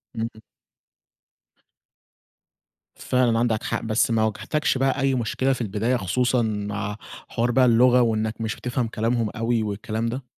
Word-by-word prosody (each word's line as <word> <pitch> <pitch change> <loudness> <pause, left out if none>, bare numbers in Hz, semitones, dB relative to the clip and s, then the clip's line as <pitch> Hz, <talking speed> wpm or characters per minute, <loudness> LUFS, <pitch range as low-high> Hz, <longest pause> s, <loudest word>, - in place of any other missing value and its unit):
امم. 115 0 -1 2.7
فعلًا 120 -3 +1
عندك 115 -2 0
حق. 115 - -2
بس 115 +1 +1
ما 110 -1 +2
واجهتكش 130 +6 0
بقى 135 +1 +1
أي 135 -1 +2
مشكلة 130 +3 0
في 125 - -5
البداية 110 +4 0
خصوصًا 125 +5 +1
مع 105 -1 -3 0.3
حوار 120 +1 0
بقى 130 +1 +4
اللغة، 125 +1 +5
وإنّك 110 -1 0
مش 110 -1 -2
بتفهم 125 -1 -2
كلامهم 115 0 -1
أوي 115 0 -1
والكلام 110 +2 -3
ده؟ 125 +3 -3
115 Hz, 140 wpm, -24 LUFS, 110-125 Hz, 2.7 s, اللغة